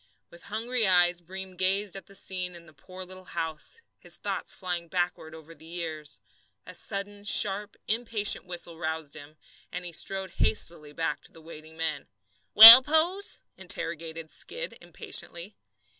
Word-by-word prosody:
With 170 Hz, -, -14 dB
hungry 225 Hz, +1 st, -1 dB
eyes 175 Hz, -1 st, +3 dB
Breem 190 Hz, +2 st, -9 dB
gazed 190 Hz, +2 st, -1 dB
at 195 Hz, -, -10 dB
the 195 Hz, -, -10 dB
scene 185 Hz, -2 st, -4 dB
in 170 Hz, -1 st, -14 dB
the 155 Hz, -, -18 dB
poor 185 Hz, +6 st, -11 dB
little 185 Hz, 0 st, -13 dB
house, 160 Hz, -, -6 dB, 0.2 s
his -, -, -4 dB
thoughts -, -, -4 dB
flying 175 Hz, -2 st, -5 dB
backward 175 Hz, -2 st, -4 dB
over 160 Hz, +1 st, -13 dB
the 160 Hz, -1 st, -17 dB
years. 160 Hz, -3 st, -7 dB, 0.5 s
A -, -, -11 dB
sudden 205 Hz, 0 st, -5 dB
sharp, 205 Hz, 0 st, +2 dB
impatient 220 Hz, -3 st, +1 dB
whistle 175 Hz, -2 st, -5 dB
roused 160 Hz, -3 st, -4 dB
him, 155 Hz, 0 st, -13 dB, 0.3 s
and 180 Hz, 0 st, -7 dB
he 175 Hz, -, -7 dB
strode 190 Hz, +3 st, -3 dB
hastily 155 Hz, -7 st, -1 dB
back 160 Hz, +2 st, -4 dB
to -, -, -17 dB
the -, -, -16 dB
waiting 160 Hz, 0 st, -14 dB
men. 155 Hz, -3 st, -4 dB, 0.5 s
"Well, 225 Hz, +4 st, +13 dB
Pose?" 325 Hz, +8 st, +2 dB, 0.2 s
interrogated 165 Hz, -1 st, -3 dB
Skid -, -, -6 dB
impatiently. 175 Hz, +5 st, -6 dB
180 Hz, 155 wpm, -27 LUFS, 160-200 Hz, 0.5 s, Well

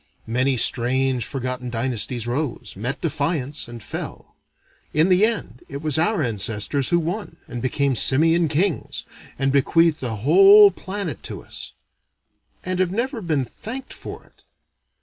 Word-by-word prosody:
Many 125 Hz, +3 st, +1 dB
strange 125 Hz, +1 st, +2 dB
forgotten 125 Hz, -1 st, -4 dB
dynasties 120 Hz, 0 st, -1 dB
rose, 125 Hz, +2 st, -3 dB
met 125 Hz, +7 st, -3 dB
defiance, 145 Hz, -3 st, -1 dB
and 120 Hz, -2 st, -10 dB
fell. -, -, -7 dB, 0.6 s
In 155 Hz, +4 st, +4 dB
the 185 Hz, +2 st, +4 dB
end 205 Hz, -, -4 dB
it 140 Hz, +2 st, -7 dB
was 155 Hz, -1 st, +2 dB
our 180 Hz, 0 st, +1 dB
ancestors 110 Hz, +4 st, 0 dB
who 175 Hz, -, +3 dB
won, 180 Hz, +6 st, -4 dB
and 120 Hz, -, -7 dB
became 135 Hz, +1 st, 0 dB
simian 165 Hz, +8 st, +3 dB
kings, 160 Hz, +3 st, -1 dB, 0.3 s
and 135 Hz, 0 st, +1 dB
bequeathed 160 Hz, +3 st, +3 dB
a 120 Hz, -4 st, -3 dB
whole 195 Hz, -, +7 dB
planet 190 Hz, -, -6 dB
to -, -, -6 dB
us -, -, -7 dB, 0.9 s
and 185 Hz, 0 st, -3 dB
have 185 Hz, -2 st, +2 dB
never 235 Hz, +3 st, -2 dB
been 155 Hz, -7 st, -1 dB
thanked 255 Hz, -, -7 dB
for -, -, -9 dB
it. -, -, -27 dB
140 Hz, 145 wpm, -22 LUFS, 125-175 Hz, 0.9 s, whole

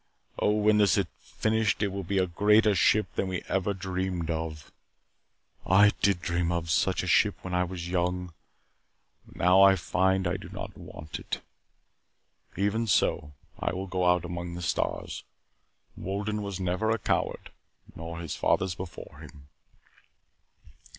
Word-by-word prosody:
Oh, -, -, +2 dB
when 105 Hz, 0 st, +3 dB
this 100 Hz, -3 st, +4 dB
is 100 Hz, -, +2 dB
finished 110 Hz, -2 st, 0 dB
it 100 Hz, -, +1 dB
will 100 Hz, +1 st, -4 dB
be 95 Hz, +3 st, -2 dB
a 95 Hz, -, +3 dB
greater 105 Hz, +4 st, +4 dB
ship 105 Hz, +3 st, +2 dB
than 95 Hz, -, -1 dB
we 95 Hz, -1 st, -3 dB
ever 95 Hz, +1 st, 0 dB
dreamed 90 Hz, -2 st, -3 dB
of. 80 Hz, -2 st, -5 dB, 0.9 s
I 100 Hz, +2 st, +6 dB
did 95 Hz, -4 st, +2 dB
dream 85 Hz, 0 st, 0 dB
of 85 Hz, -1 st, -2 dB
such -, -, +1 dB
a -, -, -4 dB
ship -, -, +4 dB
when 95 Hz, -, -5 dB
I 90 Hz, 0 st, +2 dB
was 90 Hz, -1 st, -6 dB
young. 90 Hz, 0 st, -1 dB, 0.9 s
But -, -, -17 dB
now 90 Hz, +2 st, +5 dB
I 95 Hz, 0 st, +7 dB
find 95 Hz, +1 st, +1 dB
that 90 Hz, -, 0 dB
I -, -, -2 dB
do -, -, -10 dB
not -, -, -7 dB
want 75 Hz, -1 st, -8 dB
it. -, -, -5 dB, 1.2 s
Even 105 Hz, +4 st, 0 dB
so, 75 Hz, -6 st, +1 dB, 0.3 s
I -, -, -1 dB
will 95 Hz, +1 st, -4 dB
go 90 Hz, -1 st, -1 dB
out 90 Hz, -1 st, +2 dB
among 85 Hz, 0 st, -5 dB
the 90 Hz, -, -6 dB
stars. 85 Hz, -, -2 dB, 0.7 s
Wolden 105 Hz, +3 st, -3 dB
was 100 Hz, -2 st, -5 dB
never 95 Hz, +4 st, 0 dB
a 115 Hz, -, +2 dB
coward, -, -, -2 dB, 0.4 s
nor 85 Hz, +1 st, -7 dB
his 85 Hz, -4 st, -4 dB
fathers 95 Hz, -1 st, +1 dB
before 90 Hz, +1 st, -9 dB
him." 70 Hz, -1 st, -13 dB
95 Hz, 160 wpm, -28 LUFS, 85-100 Hz, 1.2 s, I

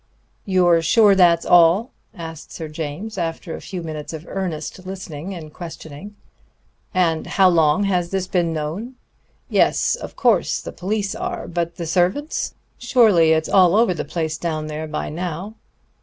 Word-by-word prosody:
"You're 180 Hz, -3 st, +3 dB
sure 200 Hz, +6 st, +5 dB
that's 175 Hz, -3 st, +4 dB
all?" 175 Hz, +7 st, +5 dB, 0.2 s
asked 165 Hz, -3 st, -8 dB
Sir 160 Hz, -, -6 dB
James, 160 Hz, +7 st, -5 dB
after 165 Hz, 0 st, -4 dB
a -, -, -7 dB
few 180 Hz, -3 st, -6 dB
minutes 155 Hz, -1 st, -6 dB
of 160 Hz, +1 st, -7 dB
earnest 185 Hz, -1 st, -4 dB
listening 185 Hz, -2 st, -7 dB
and 155 Hz, -3 st, -9 dB
questioning. 165 Hz, +3 st, -9 dB, 0.8 s
"And 165 Hz, -3 st, +1 dB
how 190 Hz, -2 st, +4 dB
long 165 Hz, +1 st, +3 dB
has 180 Hz, -3 st, 0 dB
this 190 Hz, 0 st, -1 dB
been 175 Hz, -3 st, 0 dB
known?... 165 Hz, +11 st, -4 dB, 0.5 s
Yes, -, -, +2 dB
of -, -, -9 dB
course, 230 Hz, -8 st, +2 dB
the -, -, -7 dB
police 200 Hz, +1 st, -2 dB
are; -, -, -4 dB
but 170 Hz, 0 st, -3 dB
the 170 Hz, -, -5 dB
servants? 180 Hz, -, 0 dB, 0.2 s
Surely 220 Hz, -10 st, +4 dB
it's 160 Hz, 0 st, 0 dB
all 185 Hz, -1 st, +5 dB
over 220 Hz, -3 st, +4 dB
the 165 Hz, -, -4 dB
place 160 Hz, -2 st, -3 dB
down 155 Hz, -3 st, -2 dB
there 155 Hz, +1 st, -5 dB
by 155 Hz, 0 st, -4 dB
now.... 175 Hz, +5 st, -5 dB
175 Hz, 155 wpm, -21 LUFS, 160-195 Hz, 0.8 s, sure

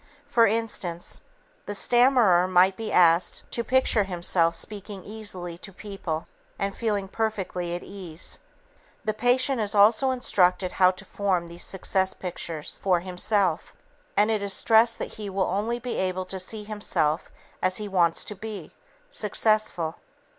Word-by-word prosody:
For 240 Hz, -5 st, +4 dB
instance, 200 Hz, -6 st, -2 dB, 0.5 s
the 205 Hz, -, -3 dB
stammerer 240 Hz, -7 st, +4 dB
might 185 Hz, +1 st, +4 dB
be 225 Hz, +2 st, -5 dB
asked 170 Hz, 0 st, +3 dB
to 235 Hz, -, -1 dB
picture 250 Hz, -5 st, +2 dB
himself 170 Hz, -2 st, +2 dB
speaking 205 Hz, -2 st, -5 dB
easily 185 Hz, -5 st, -5 dB
to 195 Hz, -, -8 dB
people, 185 Hz, -5 st, -5 dB, 0.3 s
and 195 Hz, 0 st, -2 dB
feeling 210 Hz, -4 st, -1 dB
perfectly 190 Hz, -5 st, -3 dB
at 175 Hz, -, -6 dB
ease. 185 Hz, -4 st, -5 dB, 0.7 s
The 215 Hz, -, 0 dB
patient 245 Hz, +3 st, +2 dB
is 210 Hz, 0 st, -1 dB
also 220 Hz, +6 st, +5 dB
instructed 185 Hz, -7 st, +1 dB
how 185 Hz, -1 st, +5 dB
to 185 Hz, +2 st, -6 dB
form 190 Hz, -5 st, -1 dB
these 170 Hz, +1 st, -7 dB
'success 190 Hz, 0 st, +1 dB
pictures' 170 Hz, -4 st, -4 dB
for 180 Hz, -3 st, +2 dB
himself, 185 Hz, -1 st, 0 dB, 0.4 s
and 210 Hz, +2 st, +4 dB
it 215 Hz, -2 st, 0 dB
is 200 Hz, -1 st, -1 dB
stressed 225 Hz, +3 st, +4 dB
that -, -, -5 dB
he 210 Hz, -2 st, -4 dB
will 190 Hz, 0 st, 0 dB
only 210 Hz, +6 st, -1 dB
be 245 Hz, 0 st, -5 dB
able 185 Hz, 0 st, -1 dB
to 190 Hz, +1 st, -5 dB
see 210 Hz, +3 st, -5 dB
himself 205 Hz, -7 st, -1 dB, 0.3 s
as 185 Hz, 0 st, +1 dB
he 210 Hz, -, -5 dB
wants 175 Hz, -4 st, +1 dB
to 210 Hz, -, -4 dB
be 200 Hz, -5 st, -8 dB, 0.4 s
successful. 215 Hz, -, +1 dB
195 Hz, 150 wpm, -26 LUFS, 180-215 Hz, 0.7 s, also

